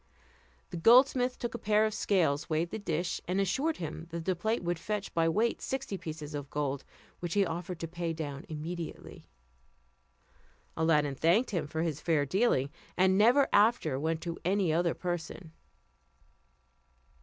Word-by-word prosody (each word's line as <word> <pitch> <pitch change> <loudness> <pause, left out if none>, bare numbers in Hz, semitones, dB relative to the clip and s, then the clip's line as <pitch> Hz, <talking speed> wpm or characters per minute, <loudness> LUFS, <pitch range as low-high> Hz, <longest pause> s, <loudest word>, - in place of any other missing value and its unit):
The 175 - -4
goldsmith 250 +5 +5
took 240 -1 -4
a 235 - -5
pair 215 0 +3
of 215 - -1
scales, 165 -8 +1
weighed 160 +2 0
the 220 - -4
dish, 170 -3 -2
and 185 +2 0
assured 265 - 0
him 165 0 -6
that 165 -1 -5
his 185 - +1
plate 220 +4 -1
would 175 -1 -1
fetch 210 +2 -4
by 165 -1 +2
weight 225 +8 +1
sixty 265 -6 -3
pieces 155 -4 -7
of 145 -1 -5
gold, 140 -2 -2 0.4
which 175 +1 -4
he 200 -1 +4
offered 175 +1 -5
to 165 - -3
pay 170 0 -3
down 145 -4 -5
immediately. 165 +2 -6 1.5
Aladdin 150 -3 +2
thanked 170 - +2
him 175 -7 -1
for 160 +2 -2
his 155 -3 -2
fair 155 -4 +2
dealing, 145 - +1 0.3
and 190 +1 +4
never 245 +7 +5
after 205 - +3
went 160 +2 -1
to 170 -1 -5
any 185 -2 +1
other 170 0 +1
person. 175 -1 -5
170 Hz, 160 wpm, -30 LUFS, 160-205 Hz, 1.5 s, goldsmith